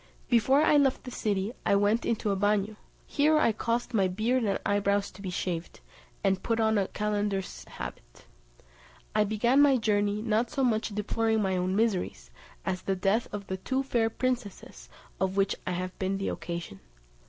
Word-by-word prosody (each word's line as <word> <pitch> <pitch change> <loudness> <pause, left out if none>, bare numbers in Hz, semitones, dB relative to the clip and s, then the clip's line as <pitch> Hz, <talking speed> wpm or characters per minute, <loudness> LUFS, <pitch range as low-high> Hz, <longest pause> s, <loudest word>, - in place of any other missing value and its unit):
Before 260 +5 +4
I 300 - +5
left 275 -2 +2
the 250 - -7
city 205 -2 -1
I - - +3
went 205 +3 +2
into 220 -2 0
a - - +1
bagnio, 205 +1 +1 0.3
here 305 +2 +3
I 305 - +4
caused 235 +3 -2
my 195 -4 +3
beard 225 +7 0
and 200 -3 +1
eyebrows 200 0 +1
to 195 - -13
be 190 - -4
shaved, 175 -2 -4 0.4
and 190 -1 +2
put 230 -1 -1
on 220 -1 +3
a 195 - 0
calender's 205 -2 -2
habit. - - -9 0.9
I 215 - +4
began 235 +6 +3
my 280 -2 +5
journey, 210 -2 0
not 225 +1 +1
so 270 - -1
much 225 -3 +1
deploring 220 +1 0
my 190 -1 0
own 185 +1 0
miseries, 185 - -1 0.3
as 185 -1 -2
the 195 - -1
death 195 +5 +1
of 205 -1 -5
the 190 -1 -4
two 260 +8 -1
fair 235 -4 +1
princesses, 220 - -4 0.3
of 190 +1 -1
which 195 0 +2
I 180 - 0
have 185 +1 -4
been 190 0 -1
the 195 - -2
occasion. 170 - -5
210 Hz, 180 wpm, -28 LUFS, 190-230 Hz, 0.9 s, I